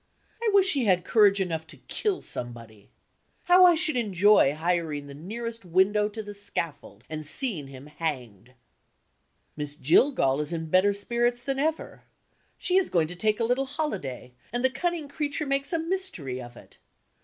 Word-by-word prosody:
I 465 - +1
wish 390 -2 +5
he 270 -4 0
had 180 -3 +2
courage 205 -3 +4
enough 165 -4 -2
to - - -10
kill 410 -4 -3
somebody. 115 -4 -7 0.5
How 360 +1 +7
I 350 -1 +6
should 315 -2 +1
enjoy 205 - +4
hiring 160 -3 -1
the 140 - -10
nearest 230 +9 -6
window 190 +4 +2
to 220 +1 -7
the 205 0 -8
scaffold, 170 -7 -5
and 155 0 -6
seeing 170 - -1
him 135 0 -11
hanged! 130 - -6 1.0
Miss 145 -1 -5
Jillgall 150 - +3
is 150 - -3
in 160 -2 -4
better 185 +2 +4
spirits 240 +4 0
than 270 -1 -2
ever. 315 +2 -2 0.6
She 370 0 +1
is 385 - +2
going 165 -3 +1
to 180 - -8
take 210 +4 0
a - - +1
little 255 +3 0
holiday; 195 - -4 0.2
and 245 +2 -1
the 260 - +3
cunning 325 +3 -2
creature 295 +1 -3
makes 275 0 -1
a 335 - +1
mystery 325 - -3
of 120 -1 -11
it. - - -17
200 Hz, 170 wpm, -26 LUFS, -, 1.0 s, How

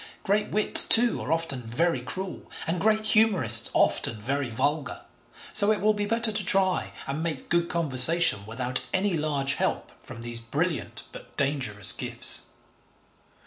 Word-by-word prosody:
Great 210 +2 -1
wits, 215 +1 +4
too, 235 +1 +5
are - - -5
often 165 -6 -2
very 125 +5 -2
cruel, 185 +9 -6 0.2
and 165 +1 -3
great 215 0 +1
humourists 190 - +4
often 110 - 0
very 135 +4 -3
vulgar, 145 +5 -3 0.5
so 205 0 +4
it 210 - -1
will 215 +1 +1
be 205 -1 -4
better 230 +1 0
to 210 -1 -1
try 190 0 0
and 140 +3 -5
'make 160 -5 -5
good 170 0 0
conversation 165 - +4
without 125 +3 -3
any 190 +1 -1
large 145 -3 -1
help - - -3
from 115 - -11
these 120 0 -5
brilliant 150 +9 -4
but - - -14
dangerous 130 -8 0
gifts.' - - +1
165 Hz, 150 wpm, -25 LUFS, 130-200 Hz, 0.5 s, too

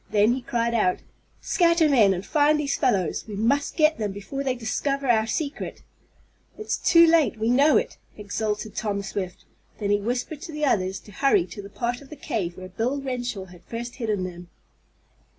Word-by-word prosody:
Then 210 +3 +4
he 260 - -3
cried 235 -1 -1
out: 200 -6 +2 0.4
"Scatter 335 -2 +3
men, 235 -9 +5
and 190 +1 -2
find 300 0 +3
these 280 -2 0
fellows! 195 - +1
We 210 - -6
must 260 +8 0
get 310 -3 +4
them 210 -2 -1
before 205 +8 -5
they 260 -2 0
discover 275 +4 -2
our 220 -2 +3
secret!" 290 +5 -4 0.7
"It's 430 - -2
too 335 -1 +6
late 325 -7 +3
we 220 +2 +1
know 280 +5 +5
it!" - - -2 0.2
exulted 210 +1 -3
Tom 200 -3 -2
Swift. 190 -2 -5 0.3
Then 205 -2 -1
he 205 0 +2
whispered 245 +7 -3
to 350 -2 -7
the 300 -1 -1
others 190 -6 +1
to 210 - -15
hurry 285 - +3
to 205 - -9
the 200 - -10
part 240 +4 -3
of 275 - -15
the - - -8
cave 175 - -3
where 185 0 -8
Bill 235 +9 -1
Renshaw 245 -7 -4
had 180 -2 -15
first 235 +1 -6
hidden 215 -6 -1
them. 175 -1 -7
235 Hz, 190 wpm, -25 LUFS, 205-280 Hz, 0.7 s, too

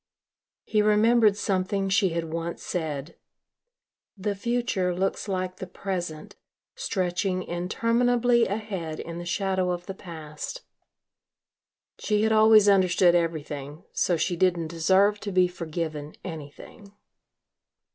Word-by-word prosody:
He 215 - +1
remembered 215 0 +4
something 195 0 0
she 195 0 +3
had 165 0 -2
once 165 +1 -4
said, 155 -2 -4 1.0
"The 205 +2 -1
future 200 -4 -1
looks 195 +3 -1
like 185 -2 -2
the 185 - -6
present, 175 -4 -5 0.4
stretching 185 - -1
interminably 235 +7 +2
ahead 190 -6 -4
in 170 0 -6
the 175 - -6
shadow 190 0 0
of 175 0 -3
the 195 - -5
past." 160 - -8 1.4
She 210 0 +1
had 220 - +2
always 215 -1 +6
understood 185 -2 +5
everything, 155 -3 -2
so 175 - +1
she 175 +2 0
didn't 170 -2 +1
deserve 190 +5 +3
to 205 - -5
be 185 -1 +4
forgiven 160 -3 -5
anything. 165 +5 -10
185 Hz, 115 wpm, -26 LUFS, 170-205 Hz, 1.4 s, always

